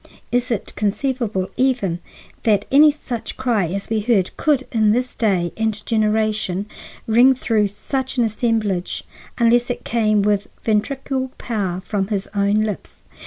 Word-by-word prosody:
Is 245 Hz, +1 st, +1 dB
it 230 Hz, -5 st, -3 dB
conceivable 210 Hz, -2 st, -1 dB
even 245 Hz, -10 st, +1 dB, 0.4 s
that 210 Hz, -3 st, +2 dB
any 295 Hz, +3 st, +7 dB
such 255 Hz, -6 st, -5 dB
cry 235 Hz, -8 st, +1 dB
as 195 Hz, +5 st, -4 dB
we 220 Hz, -, +2 dB
heard 210 Hz, -4 st, +1 dB
could, 285 Hz, -4 st, +1 dB
in 215 Hz, -3 st, +3 dB
this 250 Hz, +2 st, -1 dB
day 185 Hz, -6 st, +1 dB
and 220 Hz, -1 st, -2 dB
generation, 215 Hz, -3 st, 0 dB, 0.4 s
ring 245 Hz, +4 st, +5 dB
through 220 Hz, -4 st, +1 dB
such 265 Hz, +6 st, -3 dB
an 240 Hz, -, +4 dB
assemblage, 215 Hz, -5 st, -1 dB, 0.3 s
unless 240 Hz, +1 st, +3 dB
it 245 Hz, -, -4 dB
came 215 Hz, -3 st, +2 dB
with 205 Hz, -1 st, +1 dB, 0.2 s
ventriloquial 260 Hz, +4 st, -1 dB
power 195 Hz, -6 st, -2 dB
from 195 Hz, -1 st, -2 dB
his 200 Hz, -2 st, -2 dB
own 200 Hz, +1 st, +2 dB
lips? 215 Hz, -2 st, -4 dB
220 Hz, 145 wpm, -20 LUFS, 205-245 Hz, 0.4 s, any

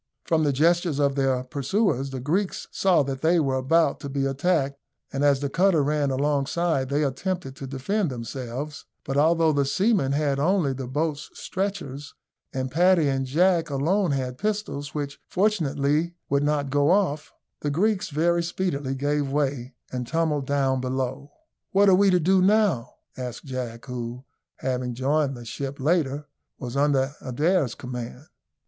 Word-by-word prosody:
From 160 Hz, -1 st, +2 dB
the 145 Hz, -, +3 dB
gestures 165 Hz, +2 st, +2 dB
of 140 Hz, -1 st, +2 dB
their 135 Hz, -2 st, +1 dB
pursuers 140 Hz, -, 0 dB
the 135 Hz, -1 st, -5 dB
Greeks 175 Hz, +10 st, -1 dB
saw 185 Hz, -6 st, +3 dB
that 135 Hz, -1 st, -4 dB
they 165 Hz, +2 st, +3 dB
were 135 Hz, -4 st, +1 dB
about 140 Hz, +3 st, +2 dB
to 140 Hz, -, -6 dB
be 135 Hz, 0 st, -1 dB
attacked, 140 Hz, 0 st, 0 dB, 0.3 s
and 135 Hz, +1 st, -1 dB
as 140 Hz, -1 st, +4 dB
the 140 Hz, -, 0 dB
cutter 170 Hz, +1 st, +3 dB
ran 145 Hz, 0 st, +1 dB
alongside 140 Hz, +1 st, 0 dB
they 145 Hz, +2 st, +1 dB
attempted 140 Hz, +1 st, -3 dB
to 135 Hz, -, -6 dB
defend 155 Hz, +9 st, -1 dB
themselves; 130 Hz, +4 st, -6 dB, 0.2 s
but 135 Hz, -, -3 dB
although 160 Hz, +2 st, +4 dB
the 145 Hz, -1 st, +2 dB
seamen 180 Hz, -, +1 dB
had 140 Hz, -1 st, +1 dB
only 165 Hz, -2 st, +2 dB
the 130 Hz, -1 st, -5 dB
boat's 150 Hz, +2 st, -2 dB
stretchers, 180 Hz, -8 st, -4 dB, 0.4 s
and 130 Hz, 0 st, -3 dB
Paddy 175 Hz, 0 st, +4 dB
and 135 Hz, -1 st, -1 dB
Jack 165 Hz, +3 st, +2 dB
alone 170 Hz, +8 st, +1 dB
had 130 Hz, -3 st, -2 dB
pistols, 200 Hz, -10 st, -3 dB
which 145 Hz, -1 st, -4 dB
fortunately 160 Hz, -5 st, +1 dB
would 140 Hz, 0 st, +2 dB
not 145 Hz, -2 st, 0 dB
go 145 Hz, +1 st, +3 dB
off, 175 Hz, -6 st, +1 dB, 0.3 s
the 145 Hz, -, -2 dB
Greeks 195 Hz, +7 st, +1 dB
very 170 Hz, +3 st, +2 dB
speedily 165 Hz, -6 st, -2 dB
gave 145 Hz, 0 st, -1 dB
way 135 Hz, -3 st, -1 dB, 0.2 s
and 125 Hz, -1 st, -4 dB
tumbled 155 Hz, -2 st, 0 dB
down 135 Hz, -2 st, +1 dB
below. 130 Hz, +2 st, -3 dB, 0.4 s
"What 200 Hz, +1 st, +5 dB
are -, -, +6 dB
we 195 Hz, +2 st, +5 dB
to 180 Hz, -1 st, +4 dB
do 185 Hz, +3 st, +3 dB
now?" 190 Hz, -, +2 dB, 0.2 s
asked 125 Hz, -2 st, -6 dB
Jack, 125 Hz, -3 st, -5 dB
who, 125 Hz, -1 st, -5 dB, 0.3 s
having 125 Hz, -2 st, -2 dB
joined 135 Hz, +1 st, 0 dB
the 120 Hz, -, -10 dB
ship 140 Hz, +4 st, -5 dB
later, 145 Hz, -1 st, +1 dB, 0.3 s
was 125 Hz, 0 st, -6 dB
under 140 Hz, -1 st, +2 dB
Adair's 145 Hz, +1 st, +1 dB
command. 125 Hz, +2 st, -7 dB
145 Hz, 160 wpm, -25 LUFS, 135-170 Hz, 0.4 s, are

